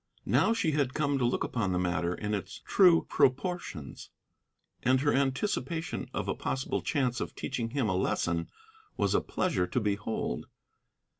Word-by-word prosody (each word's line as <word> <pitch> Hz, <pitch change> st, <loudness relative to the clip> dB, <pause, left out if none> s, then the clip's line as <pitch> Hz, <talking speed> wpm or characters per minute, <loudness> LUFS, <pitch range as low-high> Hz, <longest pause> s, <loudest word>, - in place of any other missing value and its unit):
Now -, -, +3 dB
she 200 Hz, -9 st, +1 dB
had 140 Hz, -4 st, 0 dB
come 140 Hz, -2 st, +1 dB
to 125 Hz, -, +2 dB
look 120 Hz, -, 0 dB
upon 100 Hz, -6 st, -1 dB
the -, -, +1 dB
matter 90 Hz, -1 st, 0 dB
in 105 Hz, 0 st, -3 dB
its 100 Hz, -, -4 dB
true 180 Hz, -4 st, +5 dB
proportions, 135 Hz, -, -1 dB, 0.7 s
and 130 Hz, +1 st, +3 dB
her 145 Hz, 0 st, +2 dB
anticipation 160 Hz, +5 st, -1 dB
of -, -, -3 dB
a -, -, +1 dB
possible 130 Hz, -, -2 dB
chance 125 Hz, -5 st, 0 dB
of -, -, -4 dB
teaching 120 Hz, -3 st, -3 dB
him 130 Hz, -2 st, 0 dB
a 95 Hz, -, +1 dB
lesson 85 Hz, -2 st, 0 dB, 0.5 s
was -, -, +1 dB
a -, -, +3 dB
pleasure 165 Hz, -, 0 dB
to 125 Hz, -, 0 dB
behold. 105 Hz, -, -2 dB
130 Hz, 160 wpm, -30 LUFS, 100-150 Hz, 0.7 s, true